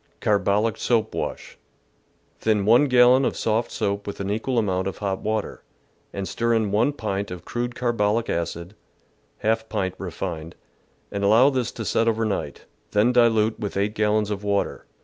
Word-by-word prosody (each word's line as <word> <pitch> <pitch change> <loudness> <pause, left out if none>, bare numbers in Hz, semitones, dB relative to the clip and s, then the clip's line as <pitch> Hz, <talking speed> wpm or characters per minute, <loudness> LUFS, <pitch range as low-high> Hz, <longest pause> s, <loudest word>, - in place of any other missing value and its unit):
Carbolic 105 +1 +1
soap 110 -2 0
Wash. - - -5 0.4
— - - -41
Thin 105 -3 +1
1 120 +7 +6
gallon 125 0 +5
of - - -1
soft 115 +1 0
soap 100 -2 -2
with 100 - -6
an 100 0 -2
equal 115 +4 -1
amount 95 -4 0
of 95 - -4
hot 95 -2 -2
water, 110 -1 -3 0.5
and 100 -1 -4
stir 115 0 0
in 110 -3 0
1 115 +8 +2
pint 100 -6 -3
of 90 -2 -8
crude 120 0 -3
carbolic 115 -2 0
acid 85 +2 -3 0.7
(% 110 +1 0
pint 95 -4 -1
refined) 85 -3 -5 0.6
and 100 0 -3
allow 115 +7 +5
this 125 -3 -1
to 110 - -6
set 115 - +1
over 115 0 +1
night, 95 -9 -4 0.3
then 105 +4 +4
dilute 115 -2 +3
with 100 -2 -4
8 100 +1 0
gallons 105 0 +1
of 105 0 -4
water. 100 -1 -1
105 Hz, 170 wpm, -24 LUFS, 100-115 Hz, 0.7 s, 1